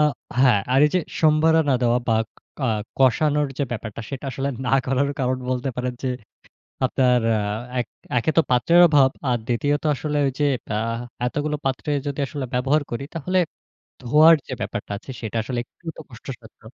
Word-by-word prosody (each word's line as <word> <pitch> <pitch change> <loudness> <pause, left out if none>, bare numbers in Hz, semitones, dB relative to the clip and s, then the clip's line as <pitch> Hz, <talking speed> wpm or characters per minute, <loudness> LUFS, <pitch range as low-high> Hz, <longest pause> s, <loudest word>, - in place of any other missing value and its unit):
আ - - +5 0.4
হ্যাঁ, 125 -6 +5
আর 135 - +5
এই - - -1
যে 180 - +4 0.2
সম্বারানা 155 -1 +4
দেওয়া 120 0 +3
বা, 115 - +4 0.5
কা 140 - -2 0.3
কষানোর 145 +3 +3
যে 145 - +1
ব্যাপারটা, 110 -2 -6
সেটা 135 -1 -6
আসলে 135 +2 -3 0.2
না 125 - -1
করার 135 +2 +1
কারণ 130 0 0
বলতে 130 +1 -1
পারেন 125 0 -2
যে, 130 - -1 0.8
আপনার 125 -1 +3 0.2
আ - - 0 0.4
এক, 120 - -2 0.3
একে 125 +7 +2
তো - - +8
পাত্রের 165 +8 +5
অভাব, 140 -4 +5 0.2
আর 120 - +2
দ্বিতীয়ত 145 +4 0
আসলে 150 +2 -3
ওইযে 140 +2 -1 0.3
আ - - 0 0.5
এতগুলো 150 +4 -1
পাত্রে 135 +2 -2 0.2
যদি 140 0 -3
আসলে 140 -1 -4
ব্যবহার 135 +5 +2
করি, 120 +4 -3
তাহলে 180 +4 0 0.6
ধোয়ার 155 +7 +7
যে - - -6
ব্যাপারটা 105 - -4
আছে, 130 - -12
সেটা 110 -1 -5
আসলে 125 +2 -4
একটু 170 - -28
তো - - -9
কষ্টসাধ্য। 120 -2 -11
135 Hz, 170 wpm, -23 LUFS, 125-150 Hz, 0.8 s, তো